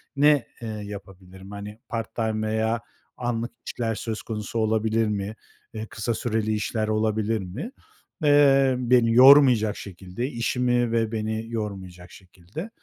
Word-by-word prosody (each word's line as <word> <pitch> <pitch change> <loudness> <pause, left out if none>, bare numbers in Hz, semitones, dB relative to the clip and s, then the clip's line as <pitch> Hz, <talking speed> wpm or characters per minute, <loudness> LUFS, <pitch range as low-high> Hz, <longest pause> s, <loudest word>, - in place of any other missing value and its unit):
ne, 145 -3 +4
eee, 115 - -5
yapabilirim? 95 -2 -9
Hani, 105 +1 -8
part-time 110 -1 -2
veya 110 +1 0 0.4
anlık 120 -1 -2 0.2
işler 115 -2 -2
söz 110 0 -4
konusu 110 +1 -4
olabilir 110 0 +1
mi? 105 0 -3 0.4
Eee, 110 0 -5
kısa 115 +1 -2
süreli 110 -1 -1
işler 110 +1 -2
olabilir 110 0 0
mi, 100 - -6 0.5
eee, 135 -3 +5
beni 120 -2 +3
yormayacak 125 -4 +7
şekilde, 95 +4 -6
işimi 120 -1 0
ve 115 -1 +1
beni 110 0 -2
yormayacak 95 -5 -6
şekilde? 95 - -10
110 Hz, 125 wpm, -25 LUFS, 105-120 Hz, 0.5 s, yormayacak